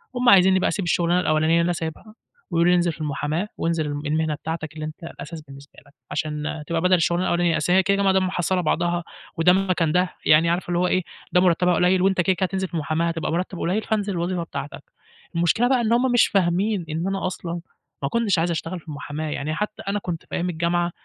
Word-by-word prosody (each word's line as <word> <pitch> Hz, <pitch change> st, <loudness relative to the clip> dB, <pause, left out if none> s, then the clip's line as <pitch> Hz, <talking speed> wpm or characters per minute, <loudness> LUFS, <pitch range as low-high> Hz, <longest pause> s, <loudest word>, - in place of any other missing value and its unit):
هم 245 Hz, 0 st, +3 dB
عايزينّي 190 Hz, -1 st, +6 dB
بقى -, -, +1 dB
أسيب 195 Hz, -4 st, -2 dB
الشُغلانة 175 Hz, +1 st, +2 dB
الأولانيّة 155 Hz, -2 st, +1 dB
اللي 170 Hz, -, +4 dB
أنا 175 Hz, -, +1 dB
سايبها 165 Hz, +7 st, -6 dB, 0.4 s
ويقولوا 170 Hz, +1 st, +3 dB
لي: -, -, +5 dB
"انزِل 175 Hz, -1 st, +2 dB
في 155 Hz, -, -11 dB
المحاماة 150 Hz, +6 st, -2 dB
وانزِل 165 Hz, -2 st, 0 dB
الم 145 Hz, 0 st, -3 dB
المهنة 155 Hz, 0 st, 0 dB
بتاعتك 160 Hz, 0 st, -5 dB
اللي 155 Hz, -1 st, -6 dB
أنت 155 Hz, +2 st, -9 dB
الأساس 165 Hz, -1 st, -8 dB
بالنسبة 140 Hz, 0 st, -14 dB
لك." 145 Hz, -, -22 dB, 0.2 s
عشان 150 Hz, 0 st, -3 dB
تبقى 165 Hz, -1 st, -1 dB
بَدَل 185 Hz, 0 st, +3 dB
الشُغلانة 175 Hz, +1 st, +2 dB
الأولانيّة، 175 Hz, -1 st, +2 dB
أصل 180 Hz, -, +1 dB
هي 190 Hz, 0 st, +5 dB
كده، 200 Hz, +1 st, +2 dB
كده 200 Hz, -, 0 dB
ما 195 Hz, -, +4 dB
دام 190 Hz, -1 st, +2 dB
محصّلة 180 Hz, 0 st, 0 dB
بعضها 175 Hz, +1 st, 0 dB, 0.3 s
وده 180 Hz, +2 st, +5 dB
مكان 185 Hz, -4 st, +1 dB
ده، 180 Hz, +1 st, +1 dB
يعني 160 Hz, +2 st, +5 dB
عارف 175 Hz, +2 st, -1 dB
اللي 175 Hz, 0 st, +1 dB
هو 180 Hz, -, +2 dB
إيه، 185 Hz, -1 st, +1 dB, 0.3 s
"ده 180 Hz, -, +4 dB
مرتّبها 180 Hz, 0 st, +3 dB
قليّل 180 Hz, +2 st, +3 dB
وأنت 190 Hz, -1 st, +3 dB
كده، 185 Hz, +2 st, +2 dB
كده 190 Hz, -, 0 dB
هتنزِل 190 Hz, 0 st, -2 dB
في -, -, -26 dB
المُحاماة 160 Hz, +1 st, 0 dB
هتبقى 165 Hz, -1 st, -2 dB
مرتَّب 180 Hz, +1 st, -2 dB
قليّل، 190 Hz, +6 st, 0 dB
فانزِل 205 Hz, -2 st, -1 dB
الوظيفة 175 Hz, 0 st, -2 dB
بتاعتك." 140 Hz, -3 st, -7 dB, 0.5 s
المشكلة 175 Hz, +8 st, +2 dB
بقى 255 Hz, -2 st, +3 dB
إن 230 Hz, 0 st, +1 dB
هم 250 Hz, +1 st, +2 dB
مش 245 Hz, -, +5 dB
فاهمين 190 Hz, 0 st, +1 dB
إن 165 Hz, +4 st, -2 dB
أنا 195 Hz, -1 st, -1 dB
أصلًا 170 Hz, -2 st, -5 dB, 0.4 s
ما 140 Hz, -, 0 dB
كنتش 225 Hz, -6 st, +1 dB
عايز 170 Hz, +1 st, +1 dB
أشتغل 170 Hz, +2 st, -4 dB
في 165 Hz, -, -23 dB
المُحاماة. 150 Hz, +1 st, -5 dB
يعني 150 Hz, +2 st, -3 dB
حتّى 210 Hz, +2 st, -4 dB
أنا 205 Hz, +1 st, 0 dB
كنت 175 Hz, -4 st, -5 dB
في -, -, -6 dB
أيام 180 Hz, +1 st, -1 dB
الجامعة، 170 Hz, +1 st, 0 dB
175 Hz, 230 wpm, -23 LUFS, 160-185 Hz, 0.5 s, عايزينّي